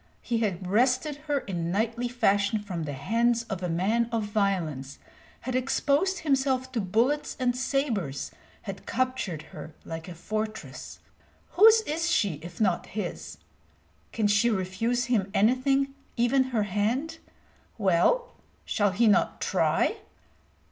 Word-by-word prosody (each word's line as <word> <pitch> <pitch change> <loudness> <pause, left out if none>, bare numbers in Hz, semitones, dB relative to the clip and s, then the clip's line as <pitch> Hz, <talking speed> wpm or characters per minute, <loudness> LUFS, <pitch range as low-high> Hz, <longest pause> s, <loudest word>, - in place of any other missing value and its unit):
He 235 -1 -1
had 195 -5 -1
wrested 255 - +2
her 285 -2 +1
in 170 -3 -3
knightly 230 +5 0
fashion 215 -3 +2
from 185 -6 -5
the 145 - -4
hands 230 - +1
of 195 -5 -5
a 180 - -2
man 215 +8 +1
of 230 -2 0
violence, 185 -10 -1 0.4
had 255 +2 -4
exposed 285 +8 +1
himself 265 -3 +1
to 240 -3 -1
bullets 235 +10 0
and 245 -1 +1
sabres, 250 - -1 0.3
had - - -8
captured 255 -11 -1
her 155 0 -9
like 165 0 -6
a 180 - -8
fortress. 215 +5 -5 0.5
Whose 440 +3 +7
is 335 -3 -2
she, 200 - +1
if 170 +1 -10
not 185 -5 +1
his? 200 -4 -5 0.7
Can 220 - -1
she 210 +3 +4
refuse 225 +5 0
him 215 -6 +1
anything, 270 +5 +2 0.2
even 250 +3 +3
her 240 -5 0
hand? 230 - -1 0.6
Well, 200 - +2 0.3
shall 205 -1 +1
he 230 +5 +3
not 210 - +3
try? - - +1
225 Hz, 135 wpm, -27 LUFS, 190-255 Hz, 0.7 s, Whose